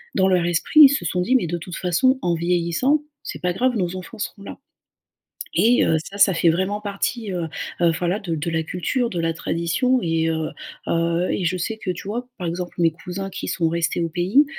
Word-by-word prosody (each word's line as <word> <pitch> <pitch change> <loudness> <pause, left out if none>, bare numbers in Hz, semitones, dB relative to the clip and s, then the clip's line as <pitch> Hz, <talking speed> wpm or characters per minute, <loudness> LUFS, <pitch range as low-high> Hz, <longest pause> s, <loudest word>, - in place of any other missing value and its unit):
dans 190 -1 +3
leur 180 -2 +2
esprit, 175 - +4
ils 280 - +10
se 285 - 0
sont 180 - -1
dit: 250 +9 +2
«Mais 245 - +3
de 175 +2 -2
toute 175 +1 -8
façon, 190 +10 +2
en 175 -1 +1
vieillissant, 175 - +1 0.2
c'est 150 - -7
pas 180 - +1
grave, 250 +6 +1
nos 180 -3 -1
enfants 185 +5 -9
seront 200 -1 -5
là» - - -8 1.0
et 240 +3 +4
heu 160 - +3
ça, 200 - -9
ça 195 -1 +5
fait 170 0 +1
vraiment 190 +5 0
partie, 205 +1 -3
heu 175 -2 -2 0.4
heu, 170 -1 +5
voilà, 180 +3 0
de 175 -6 -3
de 160 +3 -3
la 160 0 0
culture, 230 - -1
de 175 - -4
la 165 0 0
tradition 170 +11 0
et 165 -2 0
heu 160 -1 -1 0.4
heu, 170 +1 +1
et 190 - -1
je 185 +2 0
sais 200 +5 -2
que, 195 -4 -3
tu 180 - -8
vois, 245 +4 -4
par 180 - -4
exemple, 175 +1 -4
mes 165 -1 +4
cousins 185 +4 -6
qui - - -5
sont 165 -2 0
restés 170 +1 0
au 165 - 0
pays, 180 - +3
180 Hz, 225 wpm, -22 LUFS, 170-205 Hz, 1.0 s, ils